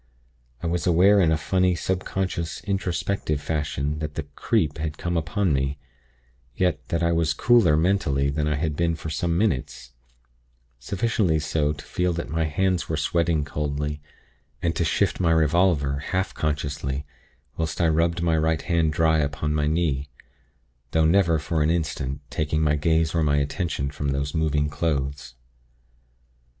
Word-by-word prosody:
I - - -2
was 85 -1 -1
aware 95 +4 +5
in 85 -4 +4
a 80 - +2
funny, 90 +5 +1
subconscious, 90 -2 -2
introspective 95 -5 -1
fashion 75 -1 -2
that 75 -2 -5
the - - -2
'creep' 75 0 -1
had 75 -1 -3
come 85 0 -2
upon 85 +2 0
me; 70 +1 -1 0.8
yet 80 -6 0
that 85 0 -1
I 85 - +2
was 80 -1 +1
cooler 110 -11 +4
mentally 75 -6 +1
than 75 +1 -1
I 75 - +1
had 75 0 -1
been 85 +1 +1
for 80 0 -6
some 85 +2 0
minutes; 70 - -1 0.9
sufficiently 95 - 0
so 75 0 0
to 70 -1 -11
feel 90 +2 0
that 85 0 -5
my 80 0 0
hands 90 +3 0
were 80 - -1
sweating 80 0 +1
coldly, 75 0 -3 0.6
and 85 -1 -1
to - - +1
shift 80 - +1
my 90 -3 +2
revolver, 80 -3 +2
half 95 +6 -2
consciously, 70 -2 -2 0.5
whilst 80 -1 -3
I 85 - +3
rubbed 85 +2 +1
my 85 -1 +2
right 80 -1 +1
hand 85 -3 +1
dry 80 0 +3
upon 75 +1 -1
my 75 -1 +1
knee; 75 -4 0 0.8
though 80 0 +3
never, 85 -1 +4
for 80 +1 -1
an 75 - +2
instant, 75 -4 -2
taking 75 +1 0
my 75 -1 +3
gaze 80 +2 +1
or 85 - +1
my 75 -2 +2
attention 70 -1 -1
from 70 0 -4
those 70 +1 -2
moving 75 -2 +1
clothes. 70 -4 -2
80 Hz, 160 wpm, -24 LUFS, 75-85 Hz, 0.9 s, aware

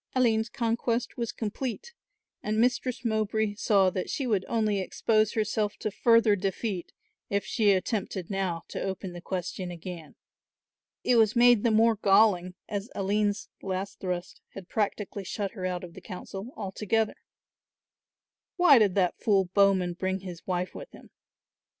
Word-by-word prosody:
Aline's 225 -3 +2
conquest 235 +1 -1
was 235 -2 -2
complete 255 - -4 0.5
and 215 +1 -2
Mistress 250 +1 0
Mowbray 220 -1 0
saw 200 -3 +3
that 185 0 -3
she 275 - -2
would 210 -6 +1
only 215 -3 +1
expose 215 +3 +1
herself 215 -1 -1
to 215 - -3
further 230 0 +4
defeat 195 0 -3 0.4
if 200 0 0
she 215 -3 +2
attempted 190 -1 -2
now 185 -4 -2
to - - -5
open 190 -1 -4
the 175 - -8
question 180 0 -4
again. 175 -2 -8 0.9
It 245 - +3
was 220 0 +4
made 240 -2 +6
the 235 - +4
more 225 0 +4
galling 195 -3 +3
as 205 +2 -4
Aline's 205 +1 0
last 190 0 -4
thrust 180 -2 -4
had 195 -3 -8
practically 205 -1 -2
shut 200 +1 -3
her 185 -4 -4
out 180 -1 -3
of 175 -2 -9
the - - -11
council 195 +2 -7
altogether. 210 +2 -1 1.4
Why 345 -8 +7
did 205 -4 +3
that 185 -3 +1
fool 195 -4 +2
Bowman 195 -3 +3
bring 190 +2 -2
his 180 -3 -9
wife 180 0 -1
with - - -9
him? - - -15
205 Hz, 150 wpm, -28 LUFS, 185-225 Hz, 1.4 s, Why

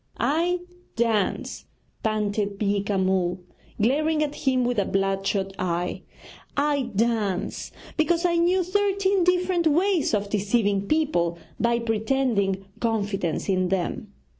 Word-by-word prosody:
'I 335 +8 +1 0.3
dance,' 225 -4 0 0.4
panted 210 -2 -1
Beeka 200 0 0
Ram, 185 -2 +1 0.4
glaring 305 +7 +2
at 295 -1 -2
him 260 -3 +1
with 245 -3 +1
a 200 - +1
bloodshot 195 0 0
eye, 175 0 -2 0.6
'I 285 -3 +1
dance 210 -4 -1 0.3
because 335 +2 +2
I 345 -1 +2
knew 360 +2 +3
thirteen 395 0 +1
different 360 -1 +2
ways 340 - +2
of 200 -1 -3
deceiving 205 -1 +1
people 225 - +1 0.2
by 235 0 +2
pretending 220 -4 0
confidence 205 -7 -1
in 185 -2 +1
them. 195 +2 -2
225 Hz, 115 wpm, -25 LUFS, 195-310 Hz, 0.6 s, knew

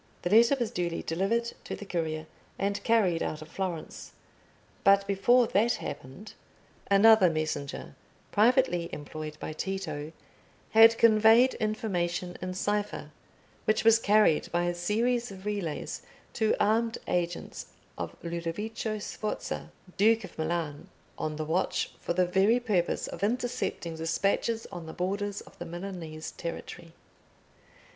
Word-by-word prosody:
The 175 - -1
letter 235 +5 +6
was 235 -3 -1
duly 170 -1 -2
delivered 205 +8 0
to - - -4
the 205 - -9
courier 160 -4 -2 0.3
and 200 +1 -1
carried 200 -8 +3
out 155 0 -3
of 155 - -15
Florence. 180 -3 -5 0.7
But 200 0 +5
before 235 +5 +4
that 225 +3 +2
happened 135 +12 -7 0.6
another 200 -1 +7
messenger, 155 -3 -3 0.4
privately 215 -6 +3
employed 155 +1 -7
by - - -5
Tito, 155 -4 -4 0.6
had 225 +1 +7
conveyed 225 +3 +6
information 180 -5 -2
in 185 0 -4
cipher, 205 +2 -2 0.5
which 215 - +2
was 225 0 +6
carried 210 -7 +3
by 175 0 +1
a 175 0 0
series 230 +7 0
of 190 0 -11
relays 200 -7 -3 0.3
to 220 -2 +2
armed 225 +2 +2
agents 175 -1 -2 0.3
of - - -5
Ludovico 175 +6 -3
Sforza, 210 0 -4 0.3
Duke 220 +2 +4
of - - -10
Milan, 160 -2 -3 0.3
on 155 -1 -3
the 155 0 -3
watch 170 +4 0
for - - -2
the 180 +1 +3
very 195 +6 +3
purpose 205 -8 0
of - - -8
intercepting 235 -7 -2
despatches 200 +7 0
on 175 -4 -7
the 160 - -7
borders 200 +2 -2
of - - -17
the 175 - -5
Milanese 170 -3 -6
territory. 170 0 -7
195 Hz, 135 wpm, -29 LUFS, 170-220 Hz, 0.7 s, another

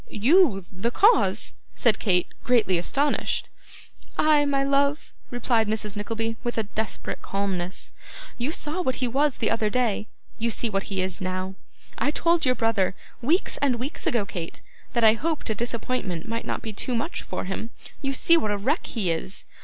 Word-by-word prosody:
'YOU 240 - +4
the 195 +5 -1
cause!' 420 - +3 0.2
said 225 -4 +3
Kate, 180 -4 +2 0.2
greatly 225 -7 +3
astonished. 280 +11 0 0.7
'I, 305 -1 +4
my 275 -1 +2
love,' 280 +2 +1 0.2
replied 235 -2 +1
Mrs. 215 -1 -1
Nickleby, 225 +2 -3
with 240 -1 -2
a 225 - +2
desperate 215 +1 -4
calmness. 190 -2 -2 0.4
'You 245 +5 -1
saw 320 +2 -1
what 260 -7 0
he 255 - -1
was 275 +3 +1
the 225 - +1
other 225 -2 +1
day; 220 -3 0 0.3
you 230 +1 +1
see 230 0 -2
what 195 -1 -1
he 195 -2 0
is 190 +1 0
now. 185 0 -2 0.5
I - - +2
told 335 +1 +2
your 255 - +4
brother, 220 -6 +1 0.3
weeks 315 +10 +1
and 275 -3 +2
weeks 255 +5 -4
ago, 235 -4 +1
Kate, 170 -4 -6 0.3
that 235 -2 +1
I 220 -1 +8
hoped 305 +1 -2
a - - +2
disappointment 230 -5 -2
might 230 +1 -3
not - - -3
be 220 - -4
too 245 +5 -2
much 235 +9 -2
for - - -4
him. 195 +4 -4 0.3
You 275 -1 -1
see 335 +5 +5
what 215 - 0
a 205 - 0
wreck 270 - 0
he 200 -8 0
is. 185 +4 -4
230 Hz, 180 wpm, -25 LUFS, 200-275 Hz, 0.7 s, I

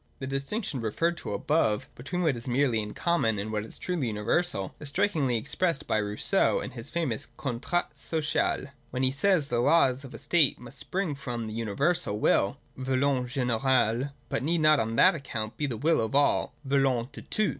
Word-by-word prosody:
The 130 - -5
distinction 135 - -3
referred 165 +11 0
to - - -6
above 105 0 +1
between 180 +8 -3
what 155 -6 +2
is 120 +2 -7
merely 125 -2 +2
in 105 0 -7
common, 170 -11 +1
and 105 +2 -3
what 105 -1 -1
is 110 - -6
truly 175 -8 -2
universal, 105 - -1
is 150 - -1
strikingly 155 - +1
ex 110 - -5
pressed 165 -6 0
by - - +1
Rousseau 105 - +1
in 130 - -5
his 115 -2 -8
famous 145 -7 -2
' - - -35
Contrat 140 +7 -2
Social,' 145 -1 -1 0.2
when 130 +1 -2
he 130 - +3
says 160 +3 +2
that 120 - 0
the 120 - +2
laws 135 -2 +3
of 135 - -10
a - - -6
state 150 +1 +3
must 125 +2 -8
spring 185 -5 -2
from 125 -4 -5
the 110 - -6
universal 115 - 0
will 105 +2 +2 0.2
{volonte 130 0 0
ge'ne'rale), 125 -1 +2 0.2
but - - -1
need 165 +4 +1
not 155 -1 +5
on 115 -1 -1
that 185 +10 +6
account 120 -7 -5
be 150 - -1
the 120 -4 -3
will 160 +4 +2
of 110 +4 -2
all 145 0 +2
{volonU 135 -3 +1
de - - -9
tous). 215 -1 0
135 Hz, 200 wpm, -28 LUFS, 115-155 Hz, 0.2 s, that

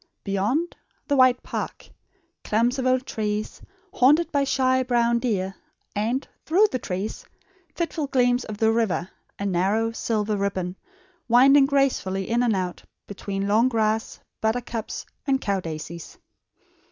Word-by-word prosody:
Beyond 215 - -1 0.3
the 285 - +2
wide 255 -2 +4
park; - - -5 0.6
clumps 240 +5 +1
of 260 - 0
old 255 0 +2
trees, 210 -2 -3 0.3
haunted 300 +7 +4
by 280 -2 +2
shy 260 -1 +2
brown 235 -2 +2
deer; 195 -6 -1 0.4
and, 230 +6 -1 0.2
through 370 +7 +4
the 255 - -1
trees, 195 +1 -4 0.5
fitful 325 -3 -2
gleams 245 -2 +2
of 215 -1 -6
the 220 +1 +3
river, 220 -6 0 0.3
a 200 - -4
narrow 200 +5 +1
silver 215 -2 -1
ribbon, 190 -2 -2 0.5
winding 270 +4 +6
gracefully 255 -9 0
in 240 +1 +2
and 235 -4 +2
out 180 -2 -3 0.2
between 200 0 -4
long 225 +5 +4
grass, 220 -2 0 0.2
buttercups, 225 0 -2 0.2
and 270 -1 +2
cow 200 -6 -1
daisies. 165 0 -7
225 Hz, 135 wpm, -24 LUFS, 200-255 Hz, 0.6 s, winding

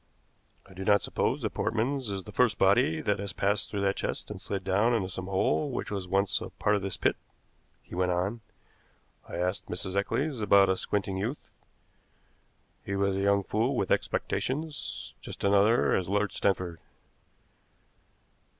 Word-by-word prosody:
"I 95 - -15
do 95 +1 -6
not 100 +1 +4
suppose - - -1
that - - -1
Portman's 125 +2 -1
is 95 -1 -3
the - - -10
first - - +2
body 80 0 +3
that 105 -1 0
has 100 -1 -4
passed 100 +1 0
through 100 - -2
that 100 0 +1
chest - - -4
and - - -7
slid 100 -2 -4
down 105 +6 +2
into 100 -5 0
some 95 0 -5
hole 95 +9 +1
which 125 - -4
was 100 -3 -3
once 95 +2 +1
a - - -5
part 105 - +1
of 100 - -1
this 95 -2 -1
pit," - - +2 0.7
he - - -15
went 90 0 +1
on. 95 +6 -1 0.9
"I - - -6
asked 90 +3 -1
Mrs. 95 +1 -3
Eccles 130 +6 0
about 100 -1 +5
a 95 - +3
squinting 100 0 -1
youth. 115 +9 -4 1.3
He 100 - -3
was 100 0 +1
a - - -1
young 100 0 +3
fool 115 +8 0
with 100 - -1
expectations, 150 +2 -2
just - - -9
such - - +2
another 100 +4 +4
as 90 -1 -1
Lord 105 0 +1
Stanford. 90 -4 -1
100 Hz, 175 wpm, -29 LUFS, 95-105 Hz, 1.3 s, about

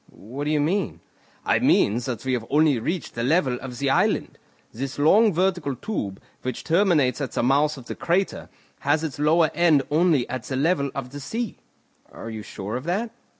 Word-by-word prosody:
"What 130 +8 -7
do - - -1
you 155 -1 +2
mean?" 175 +5 0 0.5
"I - - +3
mean 105 +4 +3
that 120 -1 -5
we 130 - 0
have 115 -3 -2
only 150 -3 +3
reached 165 +9 -3
the 115 - -4
level 130 -1 +1
of 125 -2 -7
the 140 0 0
island, - - +1 0.6
long 205 +10 +5
vertical 175 -5 0
tube, 120 - -4 0.2
which 130 -1 -4
terminates 160 - +2
at 135 - -4
the - - 0
mouth 145 +4 +2
of 130 - -11
the - - -5
crater, 180 +3 -1 0.3
has 150 +2 +1
its 150 -3 -4
lower 155 +2 +3
end 165 -5 +4
only 155 -4 +3
at 130 - -4
the 135 - -4
level 140 0 +1
of 125 -2 -5
the 145 - -7
sea." 225 - -4 0.5
"Are 115 - -8
you 110 -1 -6
sure 100 +1 -6
of 130 - -8
that?" 205 +7 -1
145 Hz, 195 wpm, -24 LUFS, 130-170 Hz, 0.6 s, long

